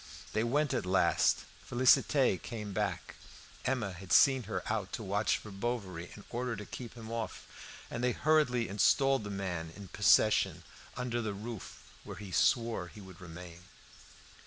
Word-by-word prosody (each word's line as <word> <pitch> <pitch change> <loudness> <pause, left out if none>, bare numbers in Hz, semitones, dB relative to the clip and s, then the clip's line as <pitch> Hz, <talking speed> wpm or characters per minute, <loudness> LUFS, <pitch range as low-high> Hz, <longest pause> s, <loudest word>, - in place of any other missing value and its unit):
They 110 - +1
went 145 +5 +1
at - - 0
last. 95 +1 +3 0.3
Félicité 130 -2 +4
came 105 -3 -6
back. 105 +1 -3 0.5
Emma 120 -7 -1
had 90 +1 -10
sent 130 -5 +5
her 110 - -3
out 105 -3 -2
to 115 - -4
watch 100 +2 +1
for 105 - -10
Bovary 95 -5 -4
in 105 - -12
order 120 0 -2
to 105 -1 -7
keep 120 +1 -8
him 115 -1 -9
off, 115 -1 -4 0.5
and 120 - -3
they 125 - +3
hurriedly 140 -6 +2
installed 135 +5 +3
the 105 - -5
man 90 -5 -4
in 100 -2 -10
possession 105 +1 +4 0.3
under 120 -1 -1
the 105 -3 -3
roof, 110 +1 -8 0.2
where - - -8
he 100 -2 -8
swore 115 -2 +2
he 105 - -13
would 95 -3 -12
remain. 85 0 -10
110 Hz, 160 wpm, -32 LUFS, 95-120 Hz, 0.5 s, sent